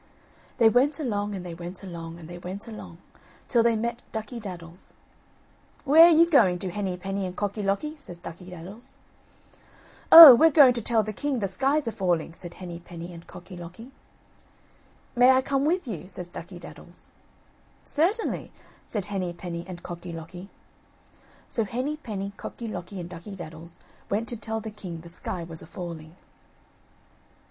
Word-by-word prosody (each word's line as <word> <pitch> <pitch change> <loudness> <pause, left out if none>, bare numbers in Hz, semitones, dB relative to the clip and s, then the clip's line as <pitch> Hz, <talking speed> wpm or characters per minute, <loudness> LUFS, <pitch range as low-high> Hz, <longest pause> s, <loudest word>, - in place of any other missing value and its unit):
They 230 - +6
went 265 +7 +3
along, 205 -7 -2
and 185 -2 -7
they 175 - -6
went 175 +3 -8
along, 165 -3 -8
and 165 -2 -11
they 175 +1 -9
went 190 +5 -7
along, 215 -6 -9 0.5
till 235 - +3
they 230 0 +3
met 235 +2 -3
Ducky 220 +2 -5
daddles. 175 -4 -10 0.9
"Where 310 +4 +8
are - - +7
you 335 0 +6
going 195 - +4
to, 180 0 -5
Henny 190 -2 -3
penny 195 +2 -3
and 180 -1 -5
Cocky 205 +1 -3
locky?" 200 +11 -1
says 180 -12 -10
Ducky 175 +1 -10
daddles. 180 +7 -11 1.2
"Oh! 325 -5 +14
we're 320 +7 +6
going 280 -4 +7
to 235 - -3
tell 225 0 +1
the 215 +1 -5
king 285 +4 -2
the 205 -4 -1
sky's 270 +8 0
a - - 0
falling," 175 -5 -1
said 175 0 -9
Henny 175 -2 -8
penny 170 0 -9
and 170 0 -12
Cocky 180 +1 -11
locky. 180 +9 -10 1.2
"May 245 +1 +6
I 260 0 +5
come 275 +1 0
with 345 -1 0
you?" 185 -5 -6
says 180 -2 -7
Ducky 175 +1 -9
daddles. 175 - -13 0.8
"Certainly," 380 +9 0 0.4
said 210 -4 -2
Henny 190 -4 -3
penny 170 -1 -6
and 180 -2 -9
Cocky 175 0 -7
locky. 175 +3 -9 1.0
So 225 - -1
Henny 255 +8 -3
penny, 200 -8 -5
Cocky 235 - -7
locky 185 -1 -6
and 170 - -6
Ducky 180 +3 -9
daddles 165 -1 -10 0.3
went 220 +3 -1
to 240 - -2
tell 220 0 -4
the 220 0 -7
king 180 -6 -8
the 170 - -12
sky 175 0 -5
was 165 -1 -6
a - - -11
falling. 170 -2 -8
195 Hz, 170 wpm, -26 LUFS, 175-235 Hz, 1.2 s, Oh